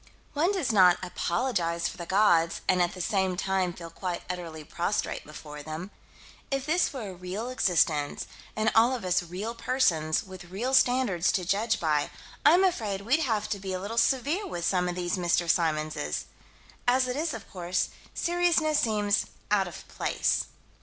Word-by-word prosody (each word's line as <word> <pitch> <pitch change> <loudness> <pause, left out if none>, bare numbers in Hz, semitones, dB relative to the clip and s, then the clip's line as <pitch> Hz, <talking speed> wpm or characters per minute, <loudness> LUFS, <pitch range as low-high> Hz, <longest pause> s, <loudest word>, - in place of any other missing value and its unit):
One 325 +6 +2
does 360 -11 0
not 185 -4 +6
apologize 175 -2 -1
for - - -7
the 170 - -7
gods 175 -5 +3
and 185 -1 +3
at 175 0 +1
the 185 - -5
same 190 -1 0
time 190 -1 0
feel 170 -1 -9
quite 180 0 -4
utterly 165 -3 -7
prostrate 175 +6 -2
before 150 -1 -9
them. 155 +6 -6 0.6
If 275 -1 -1
this 340 +4 +2
were 240 -8 -5
a - - -7
real 185 +6 -5
existence, 165 - +1 0.3
and 215 0 +2
all 235 +3 +5
of 235 - -6
us 180 0 +2
real 185 +7 -5
persons, 185 -11 +1
with 190 -3 -10
real 210 +9 -3
standards 245 -9 +3
to 185 -4 0
judge 210 +4 +1
by, 150 -3 +1 0.3
I'm 345 +6 +6
afraid 215 - 0
we'd 250 +10 +2
have 220 -8 0
to 200 - -2
be 190 -1 -4
a 185 - -2
little 215 +5 -1
severe 290 - +1
with 175 - -4
some 180 -1 +1
of 175 - -3
these 175 0 -1
Mr. 175 -1 +1
Symonses. 155 - 0 0.6
As 255 +1 +4
it 250 - -2
is, 310 -1 -1
of 220 - -9
course, 180 -1 -1 0.3
seriousness 340 -3 +2
seems 210 -2 +1 0.2
out 195 -3 +3
of 175 - -10
place. - - 0
190 Hz, 175 wpm, -28 LUFS, 175-245 Hz, 0.6 s, not